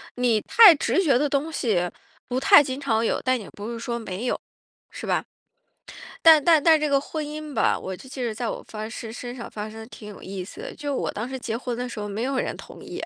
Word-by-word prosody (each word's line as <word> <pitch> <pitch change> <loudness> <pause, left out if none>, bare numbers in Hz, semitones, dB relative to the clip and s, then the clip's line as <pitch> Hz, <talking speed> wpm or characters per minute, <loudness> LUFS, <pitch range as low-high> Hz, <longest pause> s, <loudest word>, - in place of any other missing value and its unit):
你 245 -3 +2
太 420 -7 +8
直 375 +6 +1
觉 275 -6 +4
的 295 +2 +1
东 285 +3 -1
西 195 - 0 0.4
不 255 +1 0
太 275 +2 +7
经 260 0 -4
常 225 -5 0
有， - - 0
但 255 -1 +1
也 205 - -10
不 210 +3 -7
是 230 - -5
说 235 0 -3
没 220 +3 -5
有， - - -1 0.5
是 - - -8
吧？ - - 0 1.0
但 320 -3 +8
但 325 -3 +6
但 320 -2 +5
这 305 - 0
个 275 -1 +3
婚 305 +2 -5
姻 300 0 -7
吧， 225 - +2
我 190 -1 -6
就 260 - -14
记 260 -1 -5
得 225 -2 -2
在 235 0 -3
我 - - -4
发 215 0 -6
誓 225 -1 -7
身 245 +1 -7
上 235 - -7
发 215 0 -6
生 220 - -11
的 220 - -9
挺 220 -3 -11
有 200 - -12
意 190 -1 -6
思 215 - -11
的， - - -7
就 290 -2 -3
我 - - -2
当 220 +4 -4
时 265 - -5
结 230 -2 -3
婚 245 -1 -4
的 250 - -3
时 235 - -7
候， 205 - -4
没 210 +3 -3
有 270 +1 -1
人 - - -2
同 - - -12
意， - - -7
245 Hz, 280 characters per minute, -24 LUFS, 220-285 Hz, 1.0 s, 太